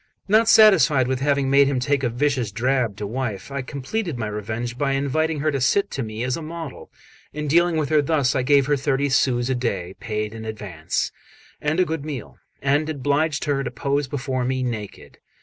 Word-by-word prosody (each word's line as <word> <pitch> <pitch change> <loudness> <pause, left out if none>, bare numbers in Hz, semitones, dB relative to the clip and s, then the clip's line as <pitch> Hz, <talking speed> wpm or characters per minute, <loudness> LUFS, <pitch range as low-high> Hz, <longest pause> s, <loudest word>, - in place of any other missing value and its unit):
Not 220 +3 +4
satisfied 170 - +6
with 130 0 -1
having 140 -1 +1
made 140 0 +6
him 135 -2 0
take 140 +2 +1
a 125 - 0
vicious 125 -2 0
drab 120 -1 0
to 105 - -4
wife, 120 +1 -4
I 140 0 -2
completed 140 - -4
my 110 - -2
revenge 110 +3 -4
by 135 +1 0
inviting 145 +3 0
her 155 +1 +1
to 140 -2 -2
sit 200 +10 +2
to 135 - -3
me 110 0 -4
as 125 0 0
a 165 - -6
model, 160 -2 -7 0.5
and 150 0 -3
dealing 170 +2 +3
with 150 -3 -1
her 155 -1 +4
thus. 145 -3 +1
I 130 - +2
gave 140 +1 +4
her 145 +1 +2
thirty 140 0 0
sous 125 -2 +2
a 130 - +1
day, 100 -8 -2
paid 105 -2 -3
in 110 0 -8
advance, 100 -7 -3 0.5
and 150 +4 0
a 185 - +4
good 160 -3 -3
meal, 145 -7 -7 0.2
and 145 +3 +2
obliged 145 +1 0
her 140 -2 0
to 125 - -3
pose 140 -2 -1
before 130 -1 -2
me 130 +1 -1
naked. 110 -5 -6
135 Hz, 205 wpm, -23 LUFS, 120-150 Hz, 0.5 s, satisfied